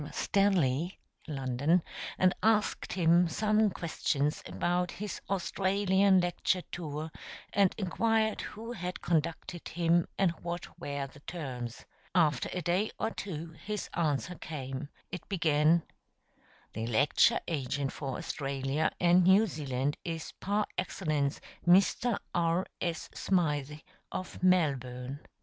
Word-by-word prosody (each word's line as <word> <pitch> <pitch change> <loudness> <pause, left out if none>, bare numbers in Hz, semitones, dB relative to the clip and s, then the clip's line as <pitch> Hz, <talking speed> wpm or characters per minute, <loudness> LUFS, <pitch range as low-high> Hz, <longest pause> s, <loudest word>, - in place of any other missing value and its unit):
Stanley 180 -5 +1 0.3
(London), 140 +4 +1 0.3
and 185 0 +4
asked 215 -1 +2
him 175 -1 +4
some 215 +5 +2
questions 150 -4 -1
about 180 0 0
his 210 +1 -5
Australian 195 0 +3
lecture 175 +1 0
tour, 155 -2 -4 0.4
and 195 -2 +4
inquired 220 +2 +1
who 225 +2 -7
had 180 -5 -5
conducted 165 +1 -1
him 170 0 +2
and 190 -3 +3
what 175 0 -6
were 140 -4 -3
the 135 +1 -13
terms. 130 -7 -6 0.3
After 150 -7 +3
a 180 - -3
day 180 +6 +1
or - - -1
two 165 -6 -5
his 210 0 -4
answer 165 +1 0
came. 140 -4 -6 0.2
It 180 - -7
began: 165 -3 +3 0.9
"The 110 +1 -3
lecture 125 +5 +4
agent 140 -3 -1
for 135 -3 -4
Australia 135 +1 -1
and 175 +1 +5
New 195 +4 +6
Zealand 145 -5 -2
is 165 -2 -4
par 205 +2 +1
excellence 155 -6 -1 0.3
Mr. 200 +5 +4 0.2
R. 170 +1 +2 0.2
S. 170 -2 -2
Smythe, 150 -6 0 0.3
of 185 - -5
Melbourne." 135 -7 +1
170 Hz, 120 wpm, -31 LUFS, 145-185 Hz, 0.9 s, New